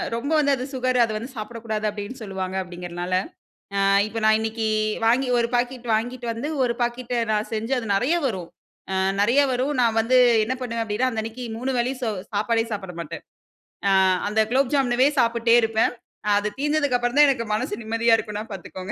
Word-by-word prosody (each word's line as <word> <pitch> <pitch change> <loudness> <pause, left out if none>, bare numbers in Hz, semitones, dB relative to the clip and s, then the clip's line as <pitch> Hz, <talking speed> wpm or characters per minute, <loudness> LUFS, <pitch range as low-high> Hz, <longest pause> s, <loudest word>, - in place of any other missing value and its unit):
ரொம்ப 275 +6 -3
வந்து 285 -1 +3
அது 255 -1 -5
சுகரு, 255 -1 0
அத 230 - 0
வந்து 235 +5 -7
சாப்பிடக்கூடாது 220 -1 -4
அப்டின்னு 210 +4 -7
சொல்லுவாங்க 190 -2 -4
அப்டிங்கிறதுனால, 175 0 -6 0.7
ஆ. - - +3 0.2
இப்போ 225 +2 -5
நான் 220 0 +5
இன்னிக்கி 220 0 -2 0.4
வாங்கி 250 +3 +3
ஒரு 235 0 +1
பாக்கெட் 245 0 -2
வாங்கிட்டு 245 +3 -2
வந்து, 230 +6 -4 0.2
ஒரு 235 -1 0
பாக்கெட்ட 240 +1 -2 0.2
நான் 210 0 0
செஞ்சு 225 +4 -3
அது 225 -3 -5
நெறையா 275 +12 +2
வரும். 185 -9 -3 0.4
அ - - 0 0.3
நெறையா 240 +8 +4
வரும். 255 +4 0
நான் 225 -1 +2
வந்து 250 +3 +3 0.3
என்ன 245 +4 -2
பண்ணுவேன் 230 -2 -2
அப்டின்னா, 225 +4 0
அந்த 220 - -2
அன்னிக்கு 225 +3 -6
மூணு 260 +3 -2
வேலயு 250 +3 0
சோ 230 - 0 0.2
சாப்பாடே 225 +2 +1
சாப்பட 190 -3 -5
மாட்டேன். 165 - -7 0.7
ஆ. - - +4 0.4
அந்த 215 +1 0
குலோப் 265 +1 +2
ஜாமூன்ன்வே 255 -1 +3
சாப்புட்டே 235 0 +3
இருப்பேன். 225 +1 +1 0.3
அ - - +2
அது 205 - -2
தீர்ந்ததுக்கு 290 -3 +1
அப்புறம் 245 +2 -1
தான் 295 - +8
எனக்கு 235 -4 0
மனசு 215 - -2
நிம்மதியா 230 +1 +3
இருக்கும்னா 210 -1 -4
பார்த்துக்கோங்க. 190 +1 -7
230 Hz, 185 wpm, -23 LUFS, 215-250 Hz, 0.7 s, தான்